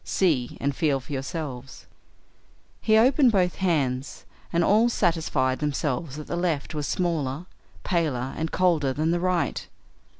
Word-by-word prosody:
See 150 -10 0
and 140 0 -1
feel 145 -3 +1
for 135 +3 -9
yourselves." 135 -2 -6 1.0
He 220 -1 +4
opened 260 +2 +5
both 180 -4 +1
hands, 140 -8 -1 0.3
and 170 0 +2
all 220 +6 +4
satisfied 160 - 0
themselves 145 -1 -2
that 150 0 -7
the - - -4
left 170 -4 -1
was 150 -2 -3
smaller, 160 -4 -1 0.4
paler, 145 -8 -1
and 160 0 -2
colder 165 -7 +2
than 155 +4 0
the 175 - +1
right. 180 -1 -1
160 Hz, 140 wpm, -25 LUFS, 135-180 Hz, 1.0 s, opened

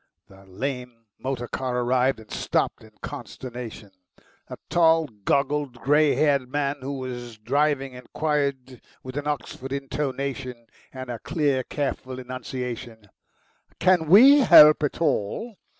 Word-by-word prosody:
The 95 0 -17
lame 125 +3 -6
motor 130 -2 -4
car 125 -1 -2
arrived, 125 +1 +1
and 110 -2 -15
stopped - - -1
in - - -15
consternation. 120 -5 -8 0.6
A - - -7
tall, 165 -1 +4
goggled, 140 +3 -1
grey 150 +1 +3
haired 140 -4 +2
man 145 0 -1
who 135 +2 -4
was 120 -3 -6
driving 140 +3 0
inquired 130 -1 -3 0.2
with 130 0 -8
an 145 0 -3
Oxford 135 -2 -4
intonation 135 -3 -4 0.3
and 130 -1 -7
a 120 - -5
clear, 145 -3 0
careful 130 -2 -4
enunciation, 125 -4 -7 0.7
"Can 180 -4 +3
WE 265 - +8
help 155 - +8
at 145 - -2
all?" 165 - -1
130 Hz, 125 wpm, -24 LUFS, 125-145 Hz, 0.7 s, WE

